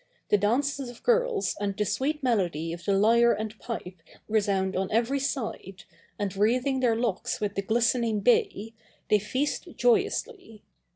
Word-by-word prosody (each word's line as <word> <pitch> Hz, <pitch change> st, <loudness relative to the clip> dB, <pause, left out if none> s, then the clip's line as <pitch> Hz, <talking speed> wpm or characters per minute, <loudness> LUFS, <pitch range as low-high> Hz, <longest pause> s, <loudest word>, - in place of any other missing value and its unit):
The 210 Hz, -, +5 dB
dances 265 Hz, +5 st, 0 dB
of 240 Hz, -, -13 dB
girls 485 Hz, -3 st, +1 dB
and 200 Hz, -1 st, -2 dB
the 210 Hz, -, +1 dB
sweet 285 Hz, +8 st, -1 dB
melody 175 Hz, -, 0 dB
of 170 Hz, 0 st, -9 dB
the 200 Hz, -1 st, +2 dB
lyre 235 Hz, +3 st, +5 dB
and 215 Hz, +1 st, -4 dB
pipe 185 Hz, -7 st, -7 dB, 0.3 s
resound 200 Hz, -3 st, 0 dB
on 190 Hz, 0 st, -1 dB
every 235 Hz, +5 st, +1 dB
side, 220 Hz, -8 st, -4 dB, 0.3 s
and 205 Hz, -2 st, -3 dB
wreathing 250 Hz, +6 st, +1 dB
their 240 Hz, -3 st, +2 dB
locks 225 Hz, -5 st, -2 dB
with 205 Hz, -1 st, -2 dB
the 195 Hz, -, -1 dB
glistening 230 Hz, 0 st, +1 dB
bay, 225 Hz, -1 st, +1 dB, 0.4 s
they 210 Hz, -, +5 dB
feast 260 Hz, +8 st, -2 dB
joyously. 400 Hz, -, 0 dB
225 Hz, 155 wpm, -27 LUFS, 200-260 Hz, 0.4 s, The